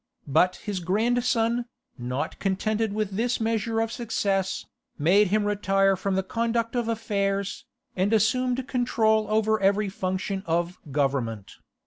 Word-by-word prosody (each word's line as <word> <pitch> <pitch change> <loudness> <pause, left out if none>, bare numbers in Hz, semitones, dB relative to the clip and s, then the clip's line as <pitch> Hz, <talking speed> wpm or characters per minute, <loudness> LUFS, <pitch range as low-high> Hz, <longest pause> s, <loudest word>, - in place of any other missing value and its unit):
But 180 +6 +3
his 205 -3 -4
grandson, 235 +5 +1 0.3
not 125 +3 -4
contented 215 +3 0
with 210 -1 -2
this 235 +5 0
measure 225 0 0
of 225 0 0
success, 200 -5 -1 0.3
made 190 +7 +4
him 210 +2 +1
retire 195 -1 +2
from 190 +1 -2
the 190 - +1
conduct 230 +3 -1
of 240 -2 0
affairs, 200 +1 -1 0.3
and 190 +3 +1
assumed 250 +4 +1
control 220 -4 +2
over 220 0 +2
every 200 +1 +2
function 190 +1 -3
of 170 +2 -1
government. 130 -7 -1
205 Hz, 130 wpm, -26 LUFS, 190-225 Hz, 0.3 s, made